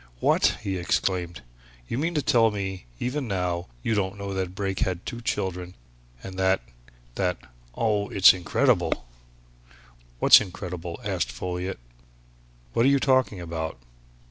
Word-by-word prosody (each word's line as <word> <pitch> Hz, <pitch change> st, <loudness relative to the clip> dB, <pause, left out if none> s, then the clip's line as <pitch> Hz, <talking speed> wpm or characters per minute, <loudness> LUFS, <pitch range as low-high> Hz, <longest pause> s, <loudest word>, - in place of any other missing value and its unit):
"What!" -, -, +3 dB
he 95 Hz, -3 st, -2 dB
exclaimed. 90 Hz, -1 st, -1 dB, 0.4 s
"You 120 Hz, -, -2 dB
mean 165 Hz, +3 st, -1 dB
to 150 Hz, -, +1 dB
tell 115 Hz, -3 st, +4 dB
me 95 Hz, -, -5 dB
that, -, -, -4 dB
even 130 Hz, +1 st, -2 dB
now, 90 Hz, -3 st, -2 dB, 0.2 s
you 115 Hz, -, +1 dB
don't 100 Hz, -2 st, -1 dB
know 100 Hz, 0 st, -5 dB
that 95 Hz, -1 st, -3 dB
Brake 95 Hz, -1 st, -2 dB
had 90 Hz, -1 st, -1 dB
two 120 Hz, -, -5 dB
children, 90 Hz, -5 st, -3 dB, 0.5 s
and 95 Hz, -1 st, -7 dB
that 95 Hz, 0 st, +3 dB, 0.5 s
that 90 Hz, +2 st, 0 dB, 0.4 s
oh, 105 Hz, -2 st, 0 dB
it's 95 Hz, -1 st, +7 dB
incredible!" 90 Hz, -8 st, +1 dB, 1.1 s
"What's -, -, +8 dB
incredible?" 90 Hz, -3 st, -6 dB
asked -, -, -1 dB
Folliot. 90 Hz, +1 st, -4 dB, 1.0 s
"What 115 Hz, -, +3 dB
are -, -, +6 dB
you 140 Hz, 0 st, +4 dB
talking 130 Hz, -7 st, +2 dB
about?" 80 Hz, -2 st, -4 dB
95 Hz, 145 wpm, -26 LUFS, 90-110 Hz, 1.1 s, What's